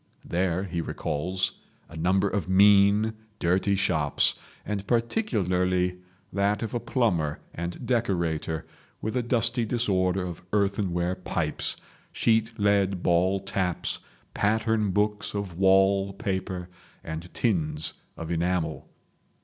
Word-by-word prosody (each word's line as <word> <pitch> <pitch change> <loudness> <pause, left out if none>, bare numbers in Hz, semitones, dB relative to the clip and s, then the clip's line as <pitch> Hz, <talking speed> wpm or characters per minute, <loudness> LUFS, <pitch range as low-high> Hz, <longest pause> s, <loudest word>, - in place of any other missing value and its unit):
There 90 +1 0
he 85 -3 -3
recalls 90 +4 -2 0.3
a 80 - -12
number 95 +5 +2
of 95 -3 -2
mean, 100 +3 +5 0.2
dirty 95 +3 +2
shops, 80 -6 +2 0.3
and 100 -1 -3
particularly 90 - +1 0.4
that 100 +2 +1
of 110 - -4
a 120 - 0
plumber 90 - 0
and 85 +7 -5
decorator, 85 -9 0 0.3
with 110 - -3
a 125 - +2
dusty 120 0 +1
disorder 95 -5 +1
of 85 -2 -6
earthenware 100 -4 +1
pipes, 85 -4 -2 0.3
sheet 115 0 +2
lead 100 -2 +2
ball 90 +3 +3
taps, 95 -2 -2 0.3
pattern 110 0 +1
books 105 +2 0
of 95 -4 -4
wall 95 +1 +4
paper, 95 -3 -3 0.4
and 80 +2 -6
tins 80 -9 0 0.2
of 85 0 -5
enamel. 85 -2 -1
95 Hz, 115 wpm, -27 LUFS, 90-105 Hz, 0.4 s, mean